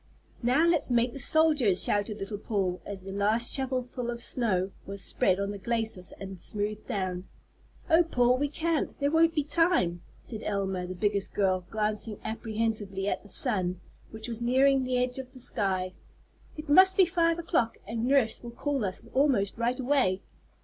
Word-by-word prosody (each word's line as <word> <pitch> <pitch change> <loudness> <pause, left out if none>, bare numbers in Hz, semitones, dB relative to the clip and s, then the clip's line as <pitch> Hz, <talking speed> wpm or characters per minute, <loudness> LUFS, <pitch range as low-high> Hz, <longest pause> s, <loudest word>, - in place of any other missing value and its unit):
"Now 260 +7 +3
let's 335 -5 +1
make 240 0 +2
the 275 - -7
soldiers," 295 - +3
shouted 205 +1 0
little 200 0 -5
Paul 195 -4 -2
as 195 -2 -7
the 195 - -7
last 215 +4 +1
shovel 260 -2 -1
full 245 -1 -6
of 235 0 -4
snow 200 -7 -1 0.2
was 195 -1 -6
spread 185 0 +1
on 200 0 -2
the 205 - -7
glacis 220 -3 -2
and 195 -2 -8
smoothed 210 0 -4
down. 185 -5 -3 0.6
"Oh, 325 +2 +5
Paul, 250 -6 +2
we 290 0 0
can't, 325 +1 -2
there 285 0 +1
won't 325 +1 +3
be 300 - +1
time," 295 - +1 0.2
said 220 -3 -8
Elma, 190 -4 -2
the 185 - -6
biggest 200 +1 -1
girl, 185 -3 +1
glancing 215 0 -1
apprehensively 220 -3 -2
at - - -1
the 205 - -15
sun, 185 -6 +4 0.3
which 220 +1 -6
was 235 -1 -5
nearing 265 +2 +3
the 255 0 0
edge 250 +1 -1
of 260 0 -9
the 260 - -12
sky. 185 -6 0 0.6
"It 305 - -7
must 375 +6 +6
be 380 - +7
five 335 -1 +1
o'clock, 325 -9 0
and 230 +1 -3
nurse 260 -5 +2
will 240 - -8
call 275 +2 -2
us 190 -2 -4
almost 255 -7 +1
right 240 +3 0
away." 250 -8 +1
230 Hz, 180 wpm, -28 LUFS, 200-270 Hz, 0.6 s, be